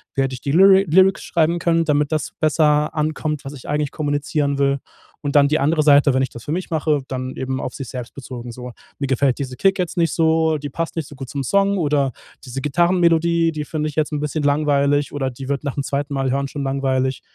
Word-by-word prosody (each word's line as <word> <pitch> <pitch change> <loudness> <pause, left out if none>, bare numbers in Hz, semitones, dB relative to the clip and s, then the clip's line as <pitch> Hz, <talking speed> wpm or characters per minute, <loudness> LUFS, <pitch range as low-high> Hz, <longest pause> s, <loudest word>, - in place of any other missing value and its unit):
Wie 135 - +2
hätte 135 0 -2
ich 125 - -7
die 140 - -2
Lyri 195 +2 +6
Lyrics 190 +4 +4
schreiben 170 0 +1
können, 165 -1 +1
damit 150 -1 +1
das 155 -2 -2
besser 150 -1 +2
ankommt, 155 -1 -2
was 135 - -6
ich 135 - -11
eigentlich 150 -1 -1
kommunizieren 145 -1 -1
will?“ 140 0 +2 0.4
Und 145 -1 -3
dann 140 -1 +6
die 155 - +2
andere 155 +3 +2
Seite, 145 -1 +5
wenn 130 - +2
ich 130 - -2
das 120 - -11
für - - -4
mich 180 +2 -3
mache, 155 -2 +1
dann 130 0 -5
eben 130 0 -3
auf 125 - -5
sich 135 -4 -7
selbst 125 -2 -7
bezogen 125 -3 -8
so: 125 +1 -8 0.3
„Mir 140 - -1
gefällt 135 0 +1
dieser 130 -2 -4
Kick 195 +7 +2
jetzt 180 -1 -2
nicht 165 -1 +1
so, 160 -1 +2
die 145 0 -6
passt 165 +3 -4
nicht 160 -4 -3
so - - -12
gut 135 -2 -8
zum 140 -1 -3
Song“ 200 +6 +2
oder 145 -5 +1 0.3
„diese 130 +1 -5
Gitarrenmelodie, 170 +1 +2
die 150 -1 -5
finde 155 0 -3
ich 145 - -10
jetzt 155 -1 0
'n 150 - -1
bisschen 150 +1 -2
langweilig 145 -1 +1
oder 135 -2 -1
die 130 +2 -9
wird 140 +1 -2
nach 140 -3 -3
dem 140 - -2
zweiten 140 +1 -3
Mal 135 -1 0
hören 140 +1 -1
schon 140 0 -5
langweilig.“ 135 -1 -1
145 Hz, 240 wpm, -20 LUFS, 135-160 Hz, 0.4 s, Lyri